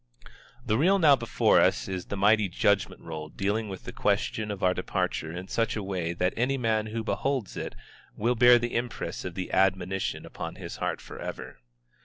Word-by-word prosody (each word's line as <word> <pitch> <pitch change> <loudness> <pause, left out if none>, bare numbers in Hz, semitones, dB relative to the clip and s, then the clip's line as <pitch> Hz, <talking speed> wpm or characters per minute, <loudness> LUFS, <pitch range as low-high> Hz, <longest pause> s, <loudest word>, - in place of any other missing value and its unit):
The 110 0 +1
reel 190 +6 +4
now 155 -6 +6
before 115 -3 +3
us - - +2
is 95 -2 -4
the 100 - -5
mighty 105 0 +4
judgment 100 +2 +1
roll 80 -2 -6
dealing 105 +5 -1
with 95 -1 -7
the - - -7
question 110 -1 0
of 100 -2 -5
our 90 0 +4
departure 80 -3 -2
in 90 +2 -6
such 115 +3 0
a 105 - -3
way 90 -4 -2
that 90 +1 0
any 130 +4 +1
man 110 -3 0
who 110 +1 -3
beholds 130 -2 -2
it - - -5 0.4
will 115 +4 +2
bear 120 0 +7
the 120 0 -3
impress 120 0 -3
of 90 -2 -5
the 95 - -4
admonition 95 0 +1
upon - - -6
his - - -7
heart - - -2
forever. - - -8
105 Hz, 190 wpm, -28 LUFS, 95-120 Hz, 0.4 s, bear